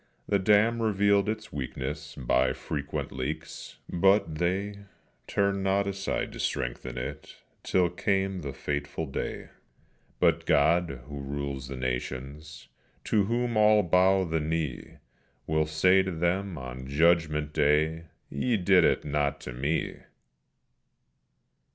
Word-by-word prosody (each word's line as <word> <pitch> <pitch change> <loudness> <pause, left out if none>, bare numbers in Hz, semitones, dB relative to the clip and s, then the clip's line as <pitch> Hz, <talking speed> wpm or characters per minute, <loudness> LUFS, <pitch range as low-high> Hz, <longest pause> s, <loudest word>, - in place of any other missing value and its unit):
The 100 - +2
dam 105 +4 +3
revealed 100 -2 +2
its 110 0 -5
weakness 75 +3 -5
by 65 -1 +1
frequent 70 0 -4
leaks, 75 +5 -6
but 95 -1 +3
they 100 +3 -1 0.5
Turned 100 0 +1
not 100 +1 +2
aside 100 0 -2
to - - -9
strengthen 60 +1 -3
it - - -6 0.3
till 90 -1 +2
came 95 +1 0
the 70 - -4
fateful 70 +3 -3
day; 70 - -5 0.7
But - - +2
God, 80 -2 +2
who 70 +1 -7
rules 70 -1 -4
the 70 - -6
nations, 65 +3 -5 0.4
to 105 -2 +2
whom 120 +2 -1
all 105 -1 +5
bow 95 +2 +4
the 80 -2 -1
knee, 80 -3 -3 0.5
Will 80 0 +1
say 90 +5 +4
to 95 0 -3
them 90 +2 -1
on 65 0 -7
judgment 75 0 +2
day, 80 +2 +2 0.3
"_Ye 115 - +1
did 95 -2 +6
it - - +2
not 75 -1 0
to 65 - -7
Me. 70 +6 -1
80 Hz, 125 wpm, -28 LUFS, 70-95 Hz, 0.7 s, did